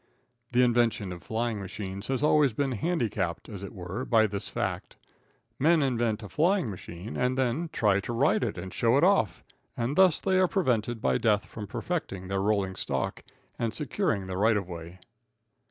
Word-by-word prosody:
The 125 +1 +4
invention 120 -5 +2
of 90 -1 -7
flying 115 -1 -2
machines 100 +1 -6
has 135 +1 -1
always 150 -4 +4
been 135 +3 0
handicapped, 110 - -1
as 100 -5 -8
it 100 - -7
were, 95 +4 -5
by 115 -3 +4
this 100 -2 -4
fact - - -3 0.6
Men 160 +2 +4
invent 120 -5 0
a - - -6
flying 165 - +2
machine 90 +2 -8
and 125 +1 0
then 135 +6 0
try 100 -3 +2
to 100 - -5
ride 130 +3 +2
it 110 -6 -2
and 90 +1 -6
show 120 +2 +3
it 145 - +3
off, 190 - +3 0.3
and 120 +4 -1
thus 185 -3 +5
they 190 -1 +2
are 185 - +4
prevented 120 - 0
by - - +2
death 105 -2 +2
from 105 -2 -8
perfecting 95 - -4
their 95 0 0
rolling 100 -2 +1
stock 65 -7 -3 0.4
and 115 -2 -1
securing 115 -8 -1
their 95 0 -4
right 110 +1 +4
of 100 -3 -3
way. 85 0 -8
115 Hz, 185 wpm, -28 LUFS, 100-135 Hz, 0.6 s, thus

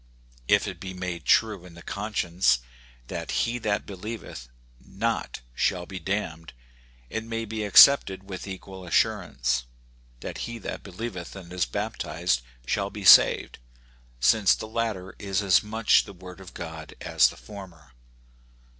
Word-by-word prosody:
If 100 0 +4
it 95 -4 -6
be 95 +1 -7
made 90 -2 -5
true 105 -5 +3
in 90 -2 -13
the 85 - -12
conscience 90 - 0 0.4
that - - -6 0.2
he 120 +1 -2
that 105 -3 -1
believeth 100 - -8 0.3
not - - -3
shall 90 +5 0
be 95 0 -7
damned, 80 -3 -3 0.6
it 115 - -3
may 115 0 -4
be 110 0 -4
accepted 100 -2 +6
with 95 0 -7
equal 95 0 -8
assurance, 60 -6 0 0.6
that - - -6
he 120 - -6
that 110 - -6
believeth 95 -2 -7
and 90 -2 -10
is 90 -7 0
baptized 80 +4 -2 0.2
shall 100 +8 -1
be 105 -1 -8
saved, - - +7 0.6
since 95 - +4
the 110 - -7
latter 110 -5 -3
is 100 0 -1
as 95 -3 +5
much 110 +1 +3
the 100 - -10
word 90 0 -12
of 95 -1 -13
God 80 -3 -8
as - - +4
the - - -12
former. 90 -9 -12
95 Hz, 145 wpm, -26 LUFS, 85-105 Hz, 0.6 s, saved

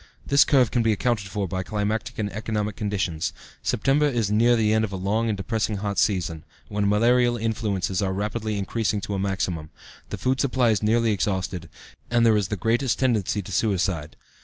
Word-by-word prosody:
This 140 +1 +5
curve 130 -5 +3
can 120 - +2
be 115 -1 +2
accounted 110 -2 -1
for 100 0 -3
by 95 +2 -3
climatic 105 +2 -2
and 105 -2 -2
economic 105 -1 -2
conditions. 95 -6 -2 0.3
September 145 +2 +2
is 115 -7 0
near 120 +3 +4
the 110 -2 +2
end 110 0 +2
of 110 - -1
the 95 - -5
long 105 +5 0
and 105 - -1
depressing 110 +1 -1
hot 100 -1 -2
season, 85 -6 0 0.3
when 105 -1 0
malarial 120 +3 +3
influences 105 -5 -1
are 95 -1 0
rapidly 105 +2 -2
increasing 105 +1 -1
to 100 - -4
a 100 - -1
maximum, 95 -5 -2 0.4
the - - -4
food 130 0 0
supply 130 -4 +2
is 105 - 0
nearly 115 +1 +2
exhausted, 95 -3 -2 0.4
and 120 -1 +3
there 110 -1 +5
is 105 -3 +1
the 105 - -2
greatest 115 +5 +1
tendency 110 -5 0
to 95 - -9
suicide. 90 -6 0
105 Hz, 190 wpm, -24 LUFS, 95-115 Hz, 0.4 s, This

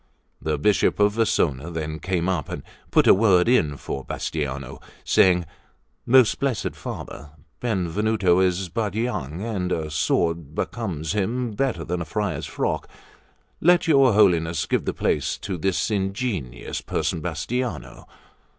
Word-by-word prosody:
The 75 -1 -1
Bishop 105 +8 +2
of 105 0 +4
Vasona 85 - +1
then 80 -1 -4
came 90 -1 -1
up, 90 -7 -1
and - - -5 0.3
put - - +4
in - - +5
a - - +9
word 95 0 +4 0.3
for 70 - -5
Bastiano, 70 -4 -4 0.2
saying: 90 -2 +4 0.6
"Most 125 -2 +5
blessed 130 -9 -1
Father, 75 - -7 0.3
Benvenuto 100 -2 +1
is 95 0 +1
but 100 +2 -2
young; 95 - -3
and 95 -6 -2
a 80 -3 -2
sword 80 0 0
becomes 85 -10 -3
him 115 +4 -1
better 110 -6 -1
than 90 +1 -3
a - - -3
friar's 105 +4 -2
frock. - - -2 0.7
Let 175 +1 +4
your 135 -6 +5
Holiness 85 -5 +3
give - - 0
the - - -1
place - - 0
to 95 - -4
this 95 +5 -1
ingenious 95 - -3
person 80 - -2
Bastiano. 90 - -4
95 Hz, 140 wpm, -24 LUFS, 80-110 Hz, 0.7 s, a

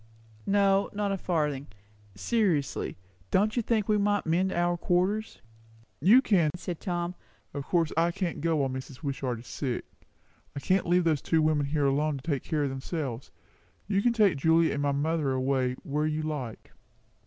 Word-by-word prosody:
"No, 195 0 +3
not 205 -1 -1
a - - +1
farthing. 150 -6 -1 0.5
Seriously, 165 - 0 0.3
don't 210 +3 +2
you 240 - +2
think 220 -2 0
we 210 -1 +3
might 205 0 +1
mend 180 +4 +1
our 175 0 +1
quarters?" 185 +5 0 0.6
"You 220 - +6
can," 175 -10 +3
said 175 -2 -5
Tom. 175 -1 -2 0.4
"Of 140 -1 -5
course 165 -2 +1
I 165 +2 +3
can't 180 -3 -3
go 165 0 +1
while 140 -3 +1
Mrs. 130 +2 -8
Wishart 135 -3 -2
is - - -17
sick. 125 -1 -3 0.7
I - - -3
can't 185 +7 +1
leave 175 +1 +3
those 155 -4 +1
two 160 -2 +2
women 150 -2 +2
alone 145 +2 +2
here - - -5
to - - -18
take 140 -3 0
care 150 -2 -1
of 140 - -1
themselves. 135 -2 -4 0.6
You 195 0 +1
can 240 - +3
take 210 -8 +3
Julia 160 +2 +3
and 140 - -2
my 145 0 +1
mother 145 0 0
away, 130 -1 0
where 150 -2 -1
you 155 0 -2
like." 140 -7 -5
160 Hz, 175 wpm, -28 LUFS, 140-190 Hz, 0.7 s, You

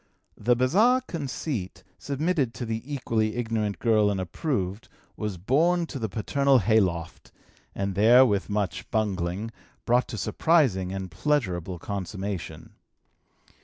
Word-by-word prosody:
The 120 +3 +2
bizarre 210 - +3
conceit, 140 - -5 0.2
submitted 140 -4 -1
to 120 - -4
the 110 0 -3
equally 115 -5 -1
ignorant 110 -4 -1
girl 110 -3 +3
and 100 -2 -1
approved, 95 - -3 0.3
was 105 -3 -4
borne 165 - +2
to 145 -4 -7
the 110 -2 -2
paternal 135 +7 +2
hay 110 0 +4
loft 85 -4 -3 0.4
and 100 0 -2
there, 115 +6 +6
with 100 -4 0
much 100 -5 -2
bungling, 100 0 -1 0.3
brought 125 +2 +2
to 110 - -6
surprising 120 - +2
and 95 -2 -5
pleasurable 95 - -1
consummation. 95 0 -5
110 Hz, 130 wpm, -26 LUFS, 95-135 Hz, 0.4 s, there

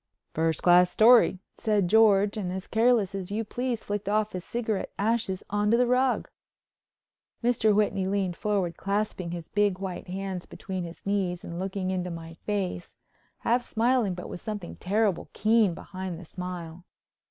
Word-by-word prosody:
"First 160 -1 0
class 180 0 +6
story," 225 0 +6 0.2
said 210 -4 +1
George, 205 0 +5
and 190 -4 -3
as 190 +1 -5
careless 225 -4 +2
as 190 -2 -4
you 215 +3 -1
please 240 +1 -3
flicked 205 -1 -3
off 215 0 +1
his 180 -1 -5
cigarette 225 -3 -2
ashes 205 -2 0
on 205 0 +1
the 235 +3 +4
rug. 250 +1 +2 1.2
Mr. 225 -3 +3
Whitney 200 -2 +1
leaned 190 -2 0
forward 190 -5 -1
clasping 200 -3 -2
his 170 -1 -6
big 205 -2 +2
white 190 -1 -5
hands 190 -1 -4
between 185 -2 -5
his 170 0 -11
knees 190 -3 -1
and 170 0 -6
looking 190 0 -2
into 180 -1 -2
my 165 -1 -7
face, 185 -1 -4 0.5
half 245 +2 +2
smiling 230 -4 +1
but 180 - -7
with - - -7
something 210 -5 -5
terrible 205 -1 0
keen 215 -4 +3
behind 185 -1 -6
the 180 - -10
smile. 180 -1 -7
195 Hz, 160 wpm, -27 LUFS, 180-215 Hz, 1.2 s, class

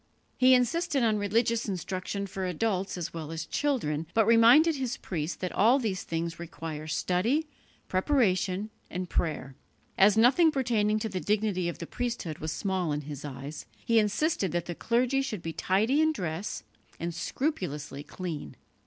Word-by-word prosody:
He 255 0 +6
insisted 290 +2 +1
on 215 -2 +2
religious 225 +3 +1
instruction 190 +2 -3
for 190 -1 -4
adults 190 +1 -1
as 170 -1 -4
well 160 -2 -6
as 165 0 -4
children, 165 - -1
but 225 -1 +5
reminded 240 +8 +6
his 260 -1 -2
priests 165 -2 -3
that 185 - -3
all 230 +7 +4
these 215 -8 -2
things 165 0 -3
require 160 -2 -6
study, 185 - +1 0.4
preparation 190 -2 +1 0.2
and 180 -1 -5
prayer. 150 -5 -1 0.5
As 200 +2 +6
nothing 260 +9 +6
pertaining 230 -7 +1
to 220 +1 -2
the 190 -2 -3
dignity 200 -3 0
of - - -6
the 170 - -6
priesthood 230 -8 -4
was 155 0 -3
small 185 -2 -1
in 145 0 -1
his 145 -1 -8
eyes, 145 +1 -7 0.2
he 230 -1 +4
insisted 210 - +1
that 175 -1 -1
the 175 - -4
clergy 245 +8 +1
should 220 -10 -4
be 165 - -4
tidy 220 - +2
in 315 0 +3
dress 180 - -4 0.4
and 170 +1 -3
scrupulously 170 - -3
clean. 165 -1 -6
195 Hz, 160 wpm, -28 LUFS, 170-235 Hz, 0.5 s, He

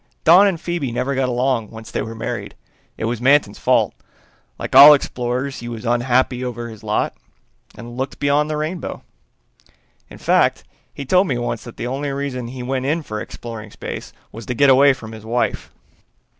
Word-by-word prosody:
"Don 180 +5 +7
and 180 -4 -1
Phoebe 170 -7 -3
never 125 +4 -1
got 130 -1 0
along 125 -3 0
once 110 -1 -11
they - - -2
were 115 +1 -6
married. 110 -3 -5 0.4
It - - -3
was 115 0 -2
Manton's 135 -5 +3
fault. - - +2 0.6
Like - - -5
all 150 +1 +11
explorers 130 0 -3
he 120 - -7
was 115 0 -7
unhappy 125 +1 +1
over 120 -1 -5
his 110 -2 -11
lot 105 0 -1 0.6
and 120 0 -9
looked 130 +2 -4
beyond 145 +1 +1
the 155 - -2
rainbow. 155 +3 -4 1.1
In - - -12
fact, - - +2 0.3
he 140 - -7
told 185 +7 +3
me 125 - -1
once 120 -1 -3
that 120 - -11
the - - -4
only 135 +3 -3
reason 135 -3 -4
he 125 +1 -7
went 130 +1 -2
in 160 +3 0
for 110 -5 -5
exploring 110 -2 -8
space - - -7 0.2
was 115 +1 -10
to 125 - -2
get 140 +2 +5
away 140 +1 +6
from 110 -4 -10
his 110 -1 -10
wife." 120 +2 -2
125 Hz, 185 wpm, -20 LUFS, 115-140 Hz, 1.1 s, all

